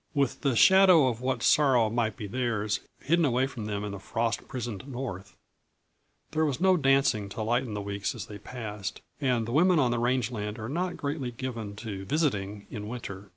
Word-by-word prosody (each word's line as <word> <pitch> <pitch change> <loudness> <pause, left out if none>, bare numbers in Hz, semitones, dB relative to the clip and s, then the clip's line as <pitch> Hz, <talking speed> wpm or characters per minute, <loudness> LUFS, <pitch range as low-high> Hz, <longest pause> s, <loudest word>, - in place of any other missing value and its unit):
With 140 -3 0
the 135 -4 +1
shadow 185 0 +7
of 120 -1 -4
what 130 +1 -1
sorrow 130 -7 +4
might 115 -2 0
be 105 - -5
theirs, 110 -2 -1 0.2
hidden 170 +3 +3
away 130 -2 +2
from 120 -6 -6
them 105 -1 -3
in 105 - -4
the 100 - -6
frost 115 +3 -2
prisoned 120 -2 -5
North, 120 -8 -6 0.9
there 155 0 +1
was 145 -3 0
no 190 +1 +5
dancing 135 - +2
to 110 +3 -4
lighten 120 0 0
the 105 - -3
weeks 100 0 -3
as - - -6
they 105 -1 -9
passed, 105 -4 -6 0.2
and 125 -5 +1
the 115 - -5
women 175 +6 +4
of 130 -5 +3
the 120 - 0
range 125 0 +1
land 105 -1 -4
are 110 0 -5
not 180 +5 -2
greatly 140 -3 -3
given 115 -4 -5
to 100 -3 -6
"visiting" 105 -8 -1
in 105 -2 -5
winter. 105 -4 -7
120 Hz, 200 wpm, -28 LUFS, 105-135 Hz, 0.9 s, shadow